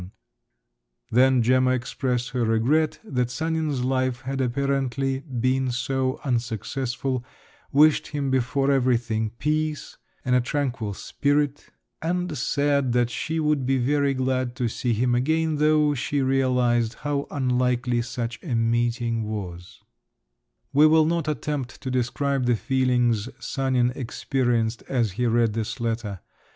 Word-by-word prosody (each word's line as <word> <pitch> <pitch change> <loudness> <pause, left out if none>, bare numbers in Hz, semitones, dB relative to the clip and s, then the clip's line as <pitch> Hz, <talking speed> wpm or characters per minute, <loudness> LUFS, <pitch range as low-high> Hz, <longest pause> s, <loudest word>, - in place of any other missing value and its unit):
Then 125 +1 +4
Gemma 130 +2 +3
expressed 125 0 -2
her 125 -2 0
regret 145 +8 +2
that 125 -2 -1
Sanin's 155 -2 -1
life 130 -1 0
had 135 +1 -3
apparently 135 +1 0
been 130 -1 -1
so 130 +1 -1
unsuccessful, 125 +1 -2 0.5
wished 150 +2 +4
him 140 -3 -2
before 130 +2 +1
everything 120 -4 +1
peace 155 +1 -2 0.3
and 125 -1 +2
a 125 - +4
tranquil 120 -6 -2
spirit, 145 +3 -1 0.3
and 175 0 -1
said 140 -1 +1
that 120 -1 +2
she 160 +5 -2
would 150 -3 +1
be 135 0 +2
very 140 +2 +1
glad 130 -1 -1
to 125 -3 -1
see 120 +2 -1
him 120 +3 +1
again, 155 +5 +1
though 150 0 +3
she 140 +2 -1
realised 125 -3 +2
how 145 -1 -1
unlikely 125 -2 0
such 120 0 -4
a 140 -9 -3
meeting 115 0 0
was…. 95 -5 -6 0.9
We 150 +3 +7
will 155 0 +5
not 165 -1 0
attempt 145 -4 -3
to 130 - -5
describe 130 +1 0
the 120 - +4
feelings 125 -2 +1
Sanin 130 -2 0
experienced 120 -2 -1
as 120 -6 +1
he 120 +6 -1
read 115 -1 +2
this 115 +3 -3
letter. 110 -5 -3
130 Hz, 130 wpm, -24 LUFS, 120-140 Hz, 0.9 s, We